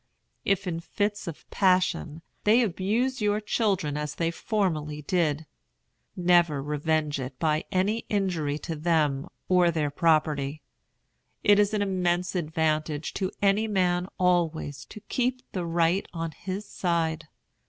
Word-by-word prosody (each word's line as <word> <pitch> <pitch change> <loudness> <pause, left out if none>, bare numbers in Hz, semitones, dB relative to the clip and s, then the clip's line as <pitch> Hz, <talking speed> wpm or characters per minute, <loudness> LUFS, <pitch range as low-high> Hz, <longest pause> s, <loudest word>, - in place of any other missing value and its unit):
If 195 -2 +1
in 170 -2 -2
fits 205 +4 -2
of 165 - -7
passion, 180 -4 +1 0.2
they 225 +4 +5
abuse 225 +6 0
your 210 0 +2
children 195 -9 0
as 150 0 -3
they 165 -1 0
formerly 155 -7 -2
did, 160 -2 0 0.7
never 175 -4 +3
revenge 150 0 0
it 130 0 -6
by 155 0 +1
any 205 +4 0
injury 175 -8 0
to 165 - -3
them 150 -3 +1 0.2
or 180 -2 +4
their 155 -3 0
property. 155 -2 +1 0.8
It 205 0 +6
is 205 0 +3
an 205 - +1
immense 180 -2 0
advantage 155 -3 -1
to 190 -2 -1
any 200 +3 +3
man 180 -3 +1
always 165 -6 0
to 215 - -11
keep 250 +3 -1
the 180 -3 -3
right 170 +3 +1
on 165 -1 -3
his 190 +6 -5
side. 165 -3 -1
175 Hz, 135 wpm, -27 LUFS, 155-195 Hz, 0.8 s, It